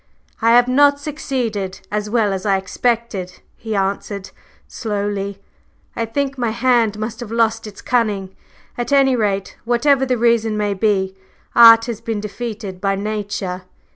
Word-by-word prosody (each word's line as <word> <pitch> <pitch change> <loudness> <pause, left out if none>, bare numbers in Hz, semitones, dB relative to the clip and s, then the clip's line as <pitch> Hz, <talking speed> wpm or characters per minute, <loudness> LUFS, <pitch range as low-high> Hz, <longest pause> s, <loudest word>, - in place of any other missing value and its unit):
"I 230 +1 +4
have 245 +1 +6
not 285 +2 +4
succeeded 250 -10 -3
as 210 0 -2
well 215 -3 +1
as 190 -1 -4
I 195 -2 +2
expected," 205 -2 -2 0.2
he 220 -2 -5
answered 195 0 -2 0.4
slowly. 205 -3 -3 0.6
"I 230 - -2
think 275 +3 -2
my 240 -2 0
hand 230 -2 +2
must 215 +1 -5
have 240 -3 -7
lost 225 -1 +1
its 205 - -11
cunning. 210 -6 0 0.4
At 240 - -3
any 270 -2 +4
rate, 200 -4 -1
whatever 265 +3 +2
the 250 -1 +1
reason 225 -2 +2
may 205 -1 0
be, 190 -2 0 0.4
Art 230 -1 +9
has 235 -3 -5
been 225 -2 -3
defeated 210 -3 -6
by 195 0 +1
Nature." 200 -3 -3
220 Hz, 150 wpm, -19 LUFS, 200-240 Hz, 0.6 s, Art